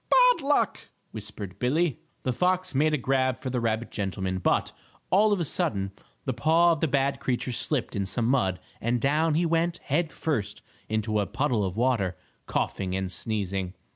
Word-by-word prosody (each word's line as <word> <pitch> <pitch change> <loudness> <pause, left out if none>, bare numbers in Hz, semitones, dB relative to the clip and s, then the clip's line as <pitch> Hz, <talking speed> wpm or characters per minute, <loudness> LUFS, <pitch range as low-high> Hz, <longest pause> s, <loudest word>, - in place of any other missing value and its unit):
"Bad - - +6
luck!" 285 +1 +1 0.2
whispered 105 -3 -7
Billie. 150 +3 +1 0.2
The 130 - 0
fox 185 +4 +1
made 150 +3 +3
a - - 0
grab 130 -1 +1
for 130 -2 -4
the 125 - 0
rabbit 115 0 -1
gentleman, 95 -2 -2
but, - - +1 0.4
all 210 +3 +5
of 205 - +2
a 170 - 0
sudden, 95 -8 -1 0.3
the 130 - 0
paw 165 +8 +4
of 165 - 0
the 160 - +2
bad 140 0 +1
creature 125 0 -1
slipped 125 +2 -1
in 100 -1 -1
some 115 +4 -1
mud 115 -8 +2 0.2
and 120 +2 +1
down 150 +4 +2
he 170 +2 +2
went, 165 +1 +1
head 160 +2 -1
first, 105 -10 -2 0.3
into 110 0 0
a 100 - 0
puddle 120 -1 0
of 95 +1 -3
water, 115 -8 +1 0.3
coughing 95 -1 -1
and 95 -1 -2
sneezing. 95 -2 -2
125 Hz, 180 wpm, -27 LUFS, 105-155 Hz, 0.4 s, Bad